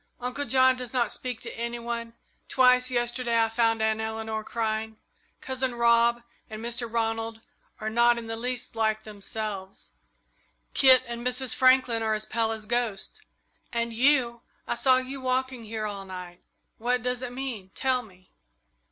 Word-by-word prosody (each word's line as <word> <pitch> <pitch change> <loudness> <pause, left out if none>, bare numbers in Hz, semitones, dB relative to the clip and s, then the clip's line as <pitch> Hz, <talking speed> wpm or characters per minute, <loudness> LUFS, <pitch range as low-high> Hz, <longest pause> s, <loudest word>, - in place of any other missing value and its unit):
Uncle 250 +4 -3
John 260 +1 +5
does 250 -1 -6
not 240 -4 +1
speak 250 -3 -4
to - - -7
any 235 +1 -3
one; 235 -1 -5 0.3
twice 250 -1 +5
yesterday 240 -1 +1
I 225 0 +3
found 225 -1 +2
Aunt 220 0 +1
Eleanor 220 0 -3
crying; 220 -1 -2 0.4
Cousin 260 -1 -2
Rob 235 0 +4 0.3
and 215 - -7
Mr. 235 0 -3
Ronald 225 -1 -1 0.4
are 215 - -4
not 235 +1 +4
in 235 - -5
the 225 0 -4
least 245 +1 -3
like 220 -1 +1
themselves; 205 -2 -6 0.8
Kit 260 -2 +7
and 235 -1 -6
Mrs. 250 0 0
Franklin 255 -3 +4
are 220 -1 +1
as 215 0 -2
pale 225 0 0
as 220 -1 -3
ghosts, 235 -3 -2 0.5
and 235 0 -1
you 240 -1 +3 0.3
I - - 0
saw 255 +2 +4
you 260 +1 -4
walking 255 -2 -1
here 215 0 -4
all 200 -2 -5
night. 180 -2 -9 0.4
What 245 +1 0
does 250 0 -1
it 250 -1 -4
mean? 245 -7 -5
Tell 260 -1 +1
me!" 185 -5 -19
235 Hz, 160 wpm, -27 LUFS, 220-250 Hz, 0.8 s, Kit